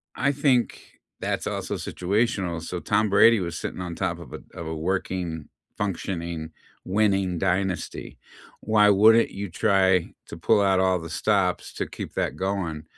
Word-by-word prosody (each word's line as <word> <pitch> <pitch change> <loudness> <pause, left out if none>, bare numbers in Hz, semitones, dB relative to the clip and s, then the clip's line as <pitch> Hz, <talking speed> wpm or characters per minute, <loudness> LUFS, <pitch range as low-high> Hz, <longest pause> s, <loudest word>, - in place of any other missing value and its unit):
I 140 - +1
think, 135 -4 0 0.3
that's - - -2
also - - -3
situational, 95 -3 -1
so 85 +2 -5
Tom 105 +3 +1
Brady 115 +3 +6
was 85 -3 -4
sitting - - -5
on 90 -2 -5
top 85 -2 -2
of 85 - -11
a - - -6
of 85 - -7
a 80 - -4
working, 85 -1 -3 0.3
functioning, 85 -5 -4 0.3
winning 95 -3 +1
dynasty. 95 0 -2 0.4
Why 105 -1 +4
wouldn't 110 +3 +5
you 100 0 -5
try 95 -1 +2
to - - -9
pull 100 +5 +3
out 95 -1 +3
all 95 -1 +2
the 80 0 -8
stops 95 +1 0
to - - -3
keep - - -8
that 70 - -2
going? 90 -4 -3
95 Hz, 155 wpm, -25 LUFS, 85-105 Hz, 0.4 s, Brady